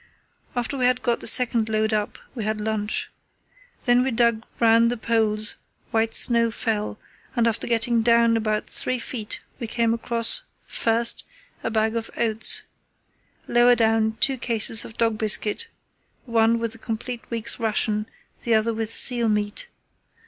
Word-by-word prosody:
After 245 Hz, +3 st, -3 dB
we 250 Hz, -, +2 dB
had 250 Hz, 0 st, +1 dB
got 240 Hz, -1 st, 0 dB
the -, -, -4 dB
second 235 Hz, -3 st, +4 dB
load 215 Hz, 0 st, 0 dB
up 210 Hz, -1 st, -2 dB, 0.2 s
we 235 Hz, -4 st, -5 dB
had 215 Hz, +1 st, -2 dB
lunch. 210 Hz, -1 st, -3 dB, 0.7 s
Then 245 Hz, 0 st, +4 dB
we 265 Hz, -, -1 dB
dug 235 Hz, -2 st, +1 dB, 0.2 s
round 230 Hz, 0 st, +4 dB
the 245 Hz, -, -3 dB
poles, 220 Hz, -1 st, -1 dB, 0.3 s
while 225 Hz, 0 st, +1 dB
snow 235 Hz, -1 st, +4 dB
fell, 215 Hz, -2 st, -3 dB, 0.4 s
and 235 Hz, -1 st, +2 dB
after 225 Hz, -, -2 dB
getting 235 Hz, 0 st, +1 dB
down 230 Hz, 0 st, +3 dB
about 215 Hz, -1 st, -1 dB
three 255 Hz, -, 0 dB
feet 230 Hz, -2 st, -6 dB, 0.2 s
we 235 Hz, -, -5 dB
came 230 Hz, 0 st, 0 dB
across, 230 Hz, -, +1 dB, 0.2 s
first, 230 Hz, +1 st, +1 dB, 0.4 s
a -, -, -1 dB
bag 220 Hz, 0 st, 0 dB
of 230 Hz, -1 st, -4 dB
oats, 225 Hz, -1 st, +1 dB, 0.8 s
lower 240 Hz, +1 st, +4 dB
down 220 Hz, -1 st, +1 dB
two 270 Hz, -4 st, +2 dB
cases 225 Hz, -2 st, +2 dB
of 225 Hz, -, -12 dB
dog 225 Hz, -2 st, 0 dB
biscuit—one 225 Hz, -, -1 dB
with 230 Hz, -1 st, -3 dB
a 225 Hz, -, -13 dB
complete 230 Hz, +2 st, -5 dB
week's 230 Hz, 0 st, -3 dB
ration, 215 Hz, -1 st, 0 dB, 0.3 s
the 235 Hz, -2 st, +1 dB
other 220 Hz, +1 st, +1 dB
with 225 Hz, 0 st, -4 dB
seal 240 Hz, -3 st, +4 dB
meat. 210 Hz, -, -2 dB
230 Hz, 155 wpm, -23 LUFS, 220-235 Hz, 0.8 s, second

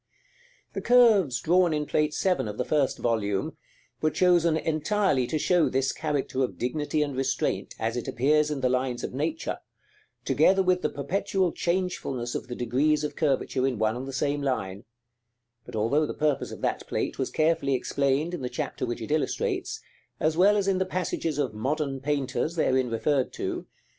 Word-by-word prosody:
The -, -, -3 dB
curves 215 Hz, -, +5 dB
drawn 175 Hz, +3 st, +3 dB
in 150 Hz, 0 st, -1 dB
Plate 150 Hz, 0 st, 0 dB
VII. 185 Hz, -, +1 dB
of 105 Hz, 0 st, -6 dB
the 125 Hz, -, -1 dB
first 145 Hz, -2 st, +1 dB
volume, 105 Hz, -4 st, -1 dB, 0.5 s
were 155 Hz, -, +3 dB
chosen 170 Hz, -2 st, +3 dB
entirely 160 Hz, -, +1 dB
to 155 Hz, -, -1 dB
show 175 Hz, +2 st, +3 dB
this 135 Hz, 0 st, +1 dB
character 145 Hz, -4 st, -2 dB
of 125 Hz, -, -3 dB
dignity 150 Hz, +4 st, -1 dB
and 145 Hz, -2 st, -4 dB
restraint, 135 Hz, -1 st, -1 dB
as 115 Hz, +1 st, -2 dB
it 120 Hz, -, -4 dB
appears 150 Hz, +4 st, +2 dB
in 145 Hz, -3 st, -3 dB
the 130 Hz, -, +3 dB
lines 125 Hz, -1 st, -1 dB
of -, -, -4 dB
nature, 315 Hz, -, -2 dB, 0.7 s
together 190 Hz, 0 st, +4 dB
with 180 Hz, 0 st, +2 dB
the -, -, 0 dB
perpetual 180 Hz, +5 st, -1 dB
changefulness 170 Hz, -10 st, -2 dB
of -, -, -4 dB
the 125 Hz, -, -5 dB
degrees 145 Hz, +6 st, +1 dB
of 150 Hz, -, -3 dB
curvature 135 Hz, -3 st, +1 dB
in 130 Hz, -4 st, -2 dB
one 110 Hz, +1 st, +1 dB
and 130 Hz, +2 st, -5 dB
the -, -, -5 dB
same 145 Hz, +2 st, -1 dB
line; 100 Hz, -8 st, -2 dB, 0.8 s
but -, -, -8 dB
although 140 Hz, +8 st, +2 dB
the -, -, -5 dB
purpose 150 Hz, -2 st, 0 dB
of -, -, -9 dB
that -, -, -2 dB
plate -, -, -2 dB
was 130 Hz, -, -1 dB
carefully 155 Hz, -4 st, +1 dB
explained 140 Hz, +5 st, 0 dB
in 175 Hz, -, -4 dB
the 125 Hz, -, -3 dB
chapter 125 Hz, 0 st, -3 dB
which 120 Hz, 0 st, -4 dB
it 110 Hz, -, -5 dB
illustrates, 150 Hz, -4 st, -1 dB, 0.4 s
as 155 Hz, +1 st, +1 dB
well 200 Hz, +4 st, +5 dB
as 200 Hz, -1 st, 0 dB
in 190 Hz, -1 st, +2 dB
the -, -, +3 dB
passages 180 Hz, -4 st, -2 dB
of 140 Hz, -6 st, -1 dB
"Modern 135 Hz, +5 st, -2 dB
Painters" 140 Hz, +3 st, -1 dB
therein 130 Hz, -5 st, +2 dB
referred 130 Hz, +4 st, 0 dB
to -, -, -3 dB
(vol. -, -, -6 dB
145 Hz, 185 wpm, -27 LUFS, 130-165 Hz, 0.8 s, curves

